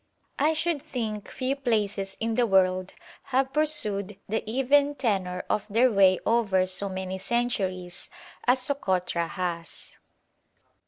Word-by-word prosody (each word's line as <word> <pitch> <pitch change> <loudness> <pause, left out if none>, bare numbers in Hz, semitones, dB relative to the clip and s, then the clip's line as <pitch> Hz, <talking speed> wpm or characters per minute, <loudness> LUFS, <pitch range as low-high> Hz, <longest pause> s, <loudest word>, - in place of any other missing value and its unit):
I 305 +3 +3
should 320 -2 0
think 225 -8 -4
few 260 +1 -2
places 210 -7 -1
in 225 0 -1
the 240 +1 +2
world 185 -1 +2 0.3
have 270 0 0
pursued 210 -10 0
the 220 +2 -1
even 280 +4 +3
tenor 190 -8 -1
of 210 - -1
their 235 +4 +3
way 190 -3 +5
over 205 -5 +2
so 185 +2 +1
many 190 0 -4
centuries 190 -7 -2 0.4
as 250 +1 +5
Sokotra 185 -11 0
has. 170 -3 -5
210 Hz, 125 wpm, -26 LUFS, 185-255 Hz, 0.4 s, way